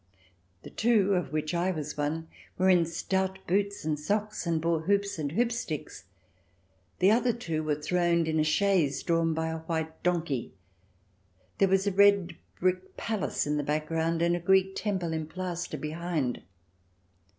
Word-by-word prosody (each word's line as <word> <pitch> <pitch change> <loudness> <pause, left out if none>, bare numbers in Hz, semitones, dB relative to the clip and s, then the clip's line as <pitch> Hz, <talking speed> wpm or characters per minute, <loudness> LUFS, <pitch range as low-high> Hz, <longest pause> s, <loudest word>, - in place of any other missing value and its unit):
The - - -10
two, 215 -4 +3
of 180 -7 -1
which 155 +1 -2
I 175 +2 +1
was 155 -4 -4
one, 155 +2 -2 0.3
were 185 +1 +3
in 175 -3 +4
stout 190 +3 -1
boots 200 0 0
and 155 -2 -1
socks, 205 +4 -2
and 165 -1 +1
bore 165 0 +1
hoops 200 +1 0
and 145 -1 -2
hoopsticks, 230 - -2 0.9
the 190 +3 +4
other 240 +2 +3
two 165 -9 -3
were 155 -1 0
throned 170 +1 +1
in 160 0 +1
a - - +4
chaise 155 -3 +2
drawn 165 -1 +1
by 160 0 -1
a 160 0 -3
white 160 -1 -4
donkey. 165 - -1 1.0
There 195 - +5
was 195 +1 +2
a 200 - +2
red 200 -2 +4 0.2
brick 185 0 -1
palace 220 -3 -1
in 150 0 0
the 145 - -1
back 150 +2 -2
ground 165 +1 0
and 170 0 +3
a - - -2
Greek 190 +2 +3
Temple 185 -6 -2
in 160 -1 -3
plaster 175 0 -4
behind. 155 -4 -2
170 Hz, 165 wpm, -29 LUFS, 160-190 Hz, 1.0 s, There